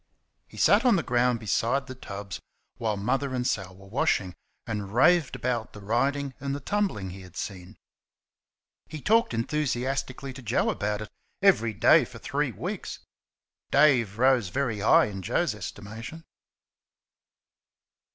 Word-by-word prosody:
He - - -15
sat 205 +4 +5
on 245 -5 +5
the 170 - 0
ground 125 -1 +2
beside 120 +5 0
the 130 - -7
tubs 100 -5 -7 0.4
while 110 -3 -1
Mother 130 +6 -1
and 125 -1 -1
Sal 95 -7 -2
were 95 +1 -15
washing, 100 - 0 0.3
and 105 -2 -4
raved 165 +3 +4
about 120 -3 -2
the 105 - -10
riding 135 +7 0
and 140 0 -3
the - - -4
tumbling 145 - -1
he 95 +1 -9
had 90 -2 -14
seen. 95 +1 -6 1.1
He 155 - -7
talked 225 +9 +3
enthusiastically 135 +1 -2
to 130 - -10
Joe 115 -1 +1
about 105 +1 -2
it 105 - -10 0.3
every 115 - +4
day - - +6
for - - -12
three - - -1
weeks. - - -5 0.7
Dave 130 -8 +4
rose 125 -5 +3
very 125 -3 -1
high 105 - +5
in 100 -2 -6
Joe's 165 - 0
estimation. 105 - -8
120 Hz, 145 wpm, -27 LUFS, 105-140 Hz, 1.1 s, day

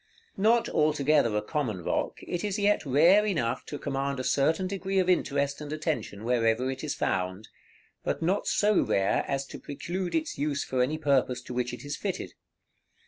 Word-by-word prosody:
Not 225 +4 +3
altogether 150 -6 +2
a 105 - -1
common 110 - -2
rock, - - -1
it 175 - -3
is 205 -1 -1
yet 205 -6 +2
rare 170 +10 +6
enough 160 - -1
to 145 - -5
command 140 -1 -2
a - - -2
certain 160 +8 +2
degree 195 0 -2
of 185 -1 +3
interest 140 -5 +1
and 150 -1 -6
attention 155 -9 -3
wherever 120 +1 +1
it 135 +2 -7
is 150 - -2
found; 95 +3 -2 0.5
but - - -1
not 185 +5 0
so 210 0 +3
rare 95 0 +1
as 135 0 -1
to - - -9
preclude 175 +5 -4
its 315 - -2
use 145 -1 0
for 130 -1 -1
any 145 +5 +1
purpose 140 -4 +1
to - - -7
which 125 0 -1
it 125 +4 -8
is 145 +1 -3
fitted. 195 +3 -4
145 Hz, 185 wpm, -28 LUFS, 125-180 Hz, 0.5 s, rare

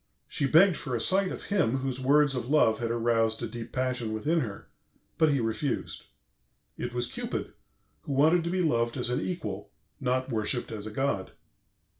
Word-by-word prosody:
She 150 -3 -1
begged 170 +4 +5
for 130 -4 -3
a - - -1
sight 190 - +2
of - - -6
him 160 - +1
whose 130 -1 -3
words 145 +2 +4
of 125 -1 -3
love 125 -7 +4
had 115 -1 -2
aroused 115 -1 +1
a - - -1
deep 115 +1 -7
passion 125 -3 -1
within 155 +10 +1
her, 105 -8 -5 0.5
but 160 - +5
he 140 -2 +2
refused. 115 +5 -2 0.7
It 120 - -4
was 120 0 -1
Cupid, 120 - -4 0.5
who 140 - -4
wanted 160 +5 +4
to - - -1
be 180 +1 0
loved 120 -5 +1
as 125 -1 +1
an 125 - 0
equal, 105 - -4 0.3
not 130 +1 -1
worshipped 110 +2 0
as 110 -1 -5
a - - -6
god. 105 -6 -2
125 Hz, 185 wpm, -28 LUFS, 115-150 Hz, 0.7 s, begged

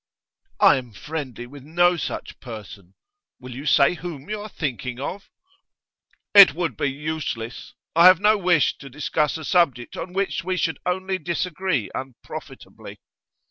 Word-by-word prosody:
'I - - +6
am 125 -4 -7
friendly 130 - -6
with 140 +3 -12
no 175 +4 +3
such 165 - -5
person. 105 -6 -10 0.4
Will 125 -1 -9
you 135 +5 -7
say 140 +2 +5
whom 170 -2 -8
you 215 -1 -3
are 215 - -8
thinking 125 - -4
of?' 190 +8 -6 1.0
'It 200 -8 +9
would 165 -8 -2
be 140 +6 -1
useless. 145 -5 -5 0.2
I 170 +2 +8
have 185 -2 +7
no 210 +2 +4
wish 180 -6 +2
to 135 - -10
discuss 150 +3 -1
a 160 - -8
subject 140 -10 +1
on 180 - -6
which 195 -3 -1
we 185 +1 -2
should 160 -2 -1
only 185 +1 -1
disagree 175 - -2
unprofitably. 130 -2 -9
155 Hz, 150 wpm, -23 LUFS, 130-180 Hz, 1.0 s, It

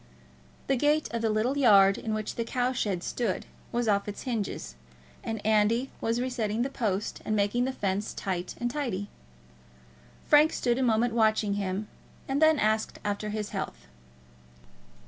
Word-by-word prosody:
The 270 - +2
gate 295 +3 +2
of 230 -1 -2
the 225 - +1
little 230 +6 +1
yard 200 -6 +6
in 220 -1 -3
which 215 -1 -3
the 230 - -2
cow 245 +2 0
shed 200 -8 -1
stood 225 -7 -2 0.3
was 240 -1 0
off 200 -1 +2
its 205 - -6
hinges, 225 - -3 0.5
and 225 -1 -3
Andy 220 +4 +2
was 230 +1 0
resetting 240 -3 -1
the 270 - -3
post 210 -6 -2
and 215 - -1
making 210 +4 +1
the 265 - -1
fence 200 -4 -2
tight 185 -2 -3
and 240 0 -1
tidy. 235 -9 -3 1.2
Frank 300 +1 +5
stood 240 0 0
a - - +1
moment 235 -1 +2
watching 215 -2 +2
him, 200 +1 -2 0.4
and 275 +2 -1
then 315 -1 +6
asked 215 -2 0
after 205 +1 -2
his 210 -1 -3
health. - - -5
220 Hz, 165 wpm, -28 LUFS, 205-245 Hz, 1.2 s, yard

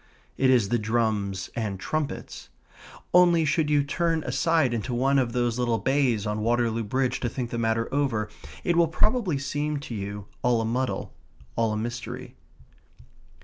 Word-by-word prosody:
It 130 - +3
is 120 -6 +4
the 120 0 +2
drums 105 -4 -1
and 105 -5 -2
trumpets. 150 - -4 0.6
Only, 175 -2 +6
should 155 0 +1
you 145 -1 +3
turn 165 +2 0
aside 135 +1 +2
into 120 +2 -2
one 135 +3 +3
of 125 -3 0
those 120 -1 0
little 120 -2 +1
bays 125 -2 +1
on 105 0 -2
Waterloo 115 0 +1
Bridge 130 +4 0
to 120 - -1
think 120 0 -4
the 120 - -2
matter 115 0 +1
over, 130 -7 +1 0.4
it 175 - +1
will 170 0 +5
probably 200 - +1
seem 145 +2 -2
to 125 - -7
you 100 -1 -5 0.2
all 125 -2 +3
a 115 - -1
muddle 125 +3 -2 0.4
all 115 -1 +1
a 105 - -1
mystery. 120 +2 -5
120 Hz, 165 wpm, -26 LUFS, 115-145 Hz, 0.6 s, Only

